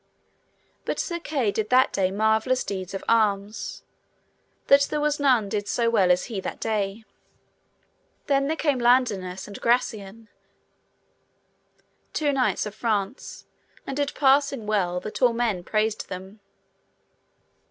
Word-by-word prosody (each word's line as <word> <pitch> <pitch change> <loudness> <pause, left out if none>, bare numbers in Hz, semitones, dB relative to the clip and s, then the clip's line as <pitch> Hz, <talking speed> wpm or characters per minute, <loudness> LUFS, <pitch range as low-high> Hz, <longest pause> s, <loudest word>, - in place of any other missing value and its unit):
But - - -3
Sir 340 -1 -3
Kay 275 -10 -1
did 215 +1 -2
that 255 +1 +4
day 190 -2 +1
marvellous 220 +5 +1
deeds 190 -1 -5
of 195 - -5
arms, 205 -2 0 0.8
that 280 0 +6
there 300 - -1
was 295 0 0
none 255 -7 +3
did 205 0 -3
so 230 +3 +1
well 195 -5 +3
as 180 0 +3
he 220 -5 -5
that - - -6
day. 215 0 -2 1.2
Then 275 -1 +2
there 320 +2 -1
came 290 -5 +1
Ladinas 220 -7 +1
and 205 - -10
Gracian, 225 -3 -1 1.9
two 295 -2 +1
knights 260 -4 +1
of 210 - -6
France, 215 +1 -3 0.4
and 270 - -4
did 285 0 -2
passing 275 -3 +3
well, 185 -4 0
that 215 +6 -7
all 245 -2 +5
men 230 -6 -1
praised 215 +2 -1
them. 190 +3 -8
220 Hz, 135 wpm, -25 LUFS, 200-260 Hz, 1.9 s, that